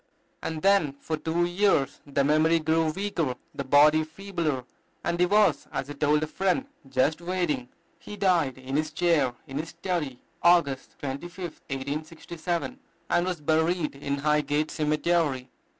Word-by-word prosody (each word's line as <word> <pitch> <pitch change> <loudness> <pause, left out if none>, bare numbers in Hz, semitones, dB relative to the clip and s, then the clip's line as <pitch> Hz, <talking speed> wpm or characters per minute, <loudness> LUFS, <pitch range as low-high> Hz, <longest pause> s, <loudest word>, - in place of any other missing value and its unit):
And 160 -1 -4
then 195 -8 +4
for 150 +3 -4
two 160 +3 0
years 175 -5 +1
the 140 0 +1
memory 155 +3 +4
grew 160 0 +2
weaker, 165 -7 -2 0.2
the 140 - -4
body 150 +3 +5
feebler, 165 -5 -3 0.4
and 170 0 -1
he 180 - +4
was, 210 +2 +3
as 140 - -3
he - - -4
told 150 +1 +2
a - - +1
friend, 195 - 0 0.2
"just 135 +5 +1
waiting." 170 -8 -1 0.3
He 210 - -9
died 175 -10 +2
in 130 +2 -3
his 155 0 -1
chair 155 -7 +2
in 135 -1 -5
his 160 +1 -4
study, 165 -6 -3 0.2
August 170 -6 +3
25th, 170 +5 -6
1867, 160 - -4 0.3
and 175 - +3
was 180 -4 -3
buried 160 +2 +1
in 140 0 -3
Highgate 150 +1 +1
Cemetery. 150 -4 0
155 Hz, 150 wpm, -27 LUFS, 145-175 Hz, 0.4 s, body